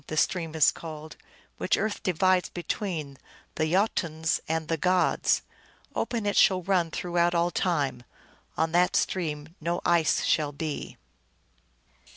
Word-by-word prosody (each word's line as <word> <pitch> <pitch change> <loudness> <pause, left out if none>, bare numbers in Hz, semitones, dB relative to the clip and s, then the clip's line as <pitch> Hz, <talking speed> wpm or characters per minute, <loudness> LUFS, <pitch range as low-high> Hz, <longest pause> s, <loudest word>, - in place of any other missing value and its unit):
Ifing - - -32
the 155 - -4
stream 165 -1 0
is 155 - +5
called 155 -1 -9 0.4
which - - +1
earth 215 -1 -2
divides 185 +1 +2
between 165 -5 -4 0.3
the 155 0 -1
Jotuns 165 -5 0
and 160 0 -1
the 165 - 0
gods. 180 +3 +2 0.5
Open 230 -4 -2
it 205 - 0
shall 185 -2 +4
run 180 -3 +1
throughout 175 +1 0
all 170 +1 +2
time. 145 -10 0 0.6
On 160 0 +1
that 180 +1 +3
stream 160 -3 -1
no 170 +2 -1
ice 170 -2 +3
shall 150 -1 +1
be." 150 0 -5
170 Hz, 140 wpm, -27 LUFS, 155-180 Hz, 0.6 s, is